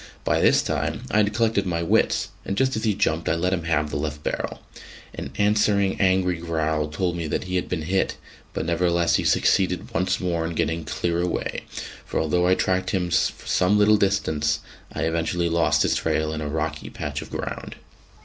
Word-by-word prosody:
By - - +1
this - - +4
time - - -2
I - - +2
had 105 -1 +3
collected 110 -3 +1
my 85 -1 -1
wits, 85 - +2
and 100 - -3
just 130 0 +2
as 110 - -2
he 105 -3 +2
jumped 85 -5 0
I - - +2
let 90 +3 0
him 85 -3 -2
have 75 -2 0
the - - -2
left 75 0 -4
barrel. - - -3 0.5
An 70 - -6
answering 100 -2 +2
angry 95 -2 +2
growl 80 -2 -1
told 90 +3 -2
me 85 -2 -3
that - - -2
he 90 0 -4
had 90 - -1
been 80 - -2
hit; 95 +4 0 0.3
but - - -3
nevertheless 85 -2 +2
he - - -1
succeeded 90 -1 +2
once 95 - +1
more 85 -3 -1
in 85 - -5
getting 80 +1 -1
clear 85 +2 -1
away, 90 - -2 0.4
for - - -2
although 90 +3 +2
I 95 - +5
tracked 95 0 0
him 90 -3 -1
for 80 - 0
some 95 +3 +3
little 105 +1 +5
distance, 80 -7 +1 0.3
I - - -3
eventually 85 +1 0
lost 85 0 +3
his - - +2
trail 80 0 0
in 80 - -4
a 75 - -3
rocky 80 +2 -3
patch 75 0 -4
of - - -9
ground. - - -5
85 Hz, 200 wpm, -24 LUFS, 80-95 Hz, 0.5 s, I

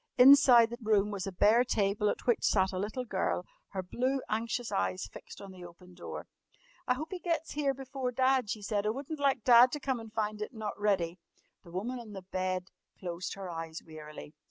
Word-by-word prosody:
Inside 250 -3 +8
the 235 - -5
room 210 -2 +2
was 195 -2 -4
a - - -3
bare 215 +6 +4
table 210 -3 +1
at - - -4
which 240 - +2
sat 190 -2 +3
a 185 - -2
little 215 +6 -3
girl, - - -1 0.2
her 190 -2 -4
blue, 255 +8 -1
anxious 230 +2 -2
eyes 95 0 -1
fixed 95 - -12
on 195 -1 -9
the 185 -1 -11
open 175 +1 -13
door. - - -7 0.6
"I 250 - +3
hope 310 +5 -6
he 370 - -4
gets 335 -2 -2
here 280 -2 0
before 265 -1 -4
Dad," 260 -2 +2
she 215 0 -4
said. 205 0 -1
"I - - +3
wouldn't 280 +6 -4
like 275 -5 +1
Dad 245 0 +7
to 295 - -2
come 265 -3 -1
and 225 -1 -10
find 215 -1 -2
it 210 - -5
not 215 -2 -4
ready!" 185 -4 0 0.4
The - - -14
woman 220 +9 -4
on 220 -3 -10
the 190 -2 -8
bed 185 0 -3 0.3
closed 180 -1 -5
her 195 -1 -7
eyes 165 -1 -6
wearily. 155 -1 -10
215 Hz, 210 wpm, -31 LUFS, 185-250 Hz, 0.6 s, Inside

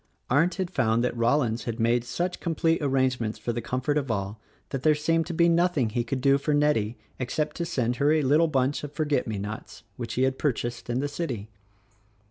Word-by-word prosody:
Arndt 165 +6 +3
had 185 -1 -3
found 115 -6 +2
that 125 - -1
Rollins 120 0 +1
had 115 0 -4
made 120 +1 +2
such 175 +10 -3
com 170 -2 -2
plete 165 +1 +2
arrangements 130 -5 0
for 120 - -3
the 120 - -3
comfort 130 +5 0
of 135 -3 -5
all 100 -1 -2 0.3
that 135 - -3
there 155 +2 +4
seemed 165 +2 +1
to 175 - -4
be 170 +1 +4
nothing 170 -8 +2
'he 120 +1 0
could 130 +2 -3
do 140 +1 +4
for 150 +1 0
Nettie 125 -7 +1 0.2
except 140 +4 -2
to 170 - -1
send 125 -3 -1
her 145 +1 +3
a 155 -1 +3
little 150 +5 +4
bunch 135 -1 0
of 145 - -5
forget 150 -3 0
me 110 -2 -2
nots 105 +3 -7
which 120 -2 -5
he 130 - +2
had 130 0 0
purchased 120 -4 -2
in 120 +2 0
the 145 - 0
city. 135 -9 -4
130 Hz, 220 wpm, -26 LUFS, 120-150 Hz, 0.3 s, there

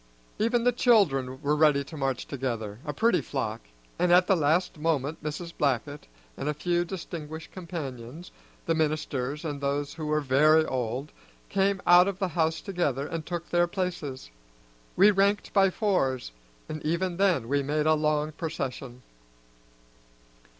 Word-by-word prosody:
Even 230 +2 +2
the 245 - +4
children 150 - +2
were 145 +1 +2
ready 150 -2 +4
to 150 - -11
march 135 -3 -2
together, 115 -6 -4
a 150 - -2
pretty 230 +10 +2
flock, 115 -5 -3 0.4
and 180 0 +2
at 180 +1 +6
the 195 - +3
last 165 +1 +1
moment 155 -1 -1
Mrs. 160 +3 -5
Blackett 145 +1 -1 0.3
and 145 - -3
a 150 - -1
few 175 +3 0
distinguished 160 -3 -7
companions, 155 -4 -7 0.3
the 165 - +1
ministers 150 -2 -2
and 145 -2 -4
those 140 +1 -1
who 155 -1 -5
were 150 0 +2
very 150 +3 +4
old, 130 +2 -3 0.4
came 195 -1 +1
out 175 +1 +7
of 200 -2 -2
the 190 -2 -1
house 160 -1 0
together 150 -8 -1
and 165 0 -5
took 170 -1 -4
their 175 0 +3
places. 170 - -4 0.6
We 200 +3 +7
ranked 200 +1 +1
by 195 -1 +5
fours, 175 - 0 0.4
and 155 0 -6
even 170 +3 -1
then 180 -12 +2
we 140 +2 +1
made 150 +2 -1
a 155 - +5
long 150 0 +1
procession. 135 -6 -5
155 Hz, 155 wpm, -27 LUFS, 140-175 Hz, 0.6 s, out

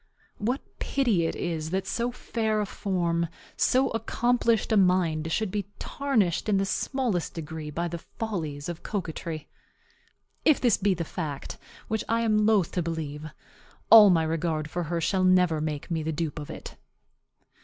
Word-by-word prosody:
What 245 +6 -1 0.2
pity 220 -12 +1
it - - -3
is 160 -3 -3
that 190 +2 -1
so 240 +1 -1
fair 220 -3 -1
a 210 - 0
form, 170 -4 -1 0.3
so 265 +1 +3
accomplished 230 0 +1
a - - +4
mind, 175 -5 +2
should 215 +2 0
be 205 -1 -2
tarnished 225 - 0
in 200 - +3
the 195 - +1
smallest 225 -2 -1
degree 160 -1 -6
by 170 +3 -2
the 170 0 -5
follies 160 -10 -5
of 175 -1 -5
coquetry! 165 -5 -4 1.0
If 305 - +5
this 240 -5 +3
be 200 -1 +2
the 170 - -2
fact, 155 -5 -5 0.3
which 220 -1 -1
I 230 +1 +2
am 215 -2 +3
loath 205 -6 +3
to 180 - -1
believe, 155 -2 -4 0.6
all 215 -3 +11
my 165 -3 +4
regard 160 -1 -1
for 175 -1 -2
her 170 +1 -2
shall 185 +3 +1
never 180 -4 +4
make 150 +1 -4
me 165 -1 0
the 160 +1 -2
dupe 155 -1 -3
of 145 - -7
it. - - -9
180 Hz, 165 wpm, -27 LUFS, 160-215 Hz, 1.0 s, all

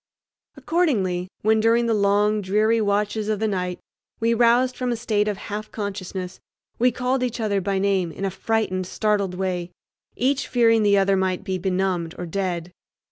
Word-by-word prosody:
Accordingly, 200 - 0 0.2
when 220 +1 +4
during 230 +2 +3
the 230 - +1
long, 210 +1 +2
dreary 215 +4 +2
watches 210 +1 0
of 215 -2 0
the 220 - +1
night 180 -3 -2 0.4
we 230 +1 +2
roused 240 +2 +3
from 250 -1 -2
a - - 0
state 215 -3 0
of 205 -2 -1
half 210 +2 -6
consciousness, 190 -3 -5 0.4
we 250 +2 +4
called 250 +1 -1
each 250 -1 -2
other 205 -3 0
by 195 +1 -1
name 190 -3 +1
in 195 - -5
a 195 - -1
frightened, 190 -2 -1
startled 200 -3 0
way, 180 -2 -2 0.5
each 270 +2 0
fearing 230 -2 +3
the 205 -1 +4
other 195 0 +3
might 185 -1 0
be 190 -2 -2
benumbed 180 -2 -1
or 180 - -4
dead. 175 -1 -3
205 Hz, 175 wpm, -23 LUFS, 190-225 Hz, 0.5 s, when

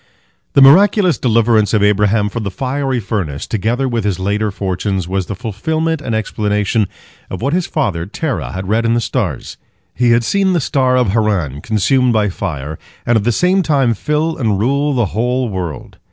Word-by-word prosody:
The 140 - +6
miraculous 185 - +5
deliverance 115 -2 +2
of 105 - +2
Abraham 105 +1 +2
from 115 - -4
the 100 - -3
fiery 130 +5 -2
furnace, 95 -10 -3
together 115 +5 -1
with 120 -3 -1
his 100 -3 -1
later 105 +3 -1
fortunes, 95 -1 -2
was 95 0 -2
the 100 - -4
fulfilment 155 - -2
and 115 -5 -2
explanation 105 -1 0 0.4
of - - -5
what 140 +3 0
his 180 -1 0
father 95 - -2
Terah 135 +5 -3
had 95 0 -5
read 110 +3 +1
in 115 0 +2
the - - +2
stars. 105 - -3 0.4
He 125 -1 +1
had 115 0 +3
seen 195 +7 +1
the 175 - +2
star 130 -3 +1
of 125 -5 +2
Haran 95 - 0
consumed 115 - +1
by 105 -2 +2
fire, 80 -6 -5 0.3
and 120 - +2
at 110 -2 +1
the 120 - +3
same 180 - +2
time 140 -8 +2
fill 150 +8 -1
and 110 -6 0
rule 140 +7 +1
the 120 -3 +2
whole 125 +2 0
world. 90 -6 -6
115 Hz, 185 wpm, -16 LUFS, 100-135 Hz, 0.4 s, The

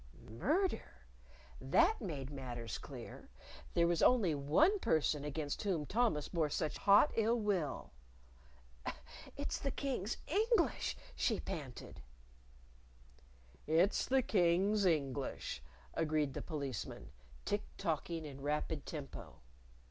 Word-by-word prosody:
Murder? 250 - -1 0.5
That 340 - +3
made 145 - -4
matters 120 -5 -5
clear! - - -9 0.5
There 170 - +5
was 170 -1 +2
only 220 -10 +5
one 160 - +3
person 155 - +1
against 145 0 -3
whom 180 -8 0
Thomas 210 -7 +1
bore 160 -3 0
such 155 +1 -2
hot 205 +9 +6
ill 230 +1 +2
will. 195 -9 -1 1.5
"It's 285 - -2
the 275 - -1
King's 250 -6 -2
English," 425 +2 +1 0.2
she - - +1
panted. 135 - -6 1.7
"It's 165 +6 +3
the 265 0 +3
King's 195 +1 +3
English," 140 - -1 0.3
agreed 155 -3 +1
the - - -4
Policeman, 140 - -5 0.3
tick 205 0 0 0.2
tocking 165 -2 -2
in 140 -2 -8
rapid 150 +1 -2
tempo. 140 - -8
165 Hz, 110 wpm, -36 LUFS, 145-215 Hz, 1.7 s, hot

